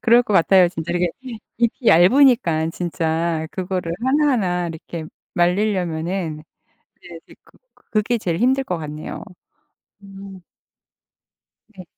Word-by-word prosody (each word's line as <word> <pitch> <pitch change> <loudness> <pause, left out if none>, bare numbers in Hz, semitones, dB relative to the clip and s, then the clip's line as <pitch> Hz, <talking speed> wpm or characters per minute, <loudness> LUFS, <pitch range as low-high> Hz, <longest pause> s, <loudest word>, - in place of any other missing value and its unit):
그럴 240 0 +5
것 215 - -4
같아요 185 0 +5
진짜. 170 -1 -5
이렇게 175 0 +1 0.5
잎이 235 +1 -1
얇으니까 180 - +4
진짜 165 -1 -2
그거를 180 -2 -3
하나하나 240 - +1
이렇게 165 0 -7 0.3
말리려면은 175 -3 -1 0.6
네 175 -2 -11
이제 - - -16
그 - - -24 0.2
그게 215 +3 -2
제일 170 -6 -2
힘들 265 +3 +2
것 180 -8 -3
같네요. 150 0 -7 0.8
음. 195 -1 -11 1.4
네. 185 - -10
180 Hz, 250 characters per minute, -20 LUFS, 165-215 Hz, 1.4 s, 그럴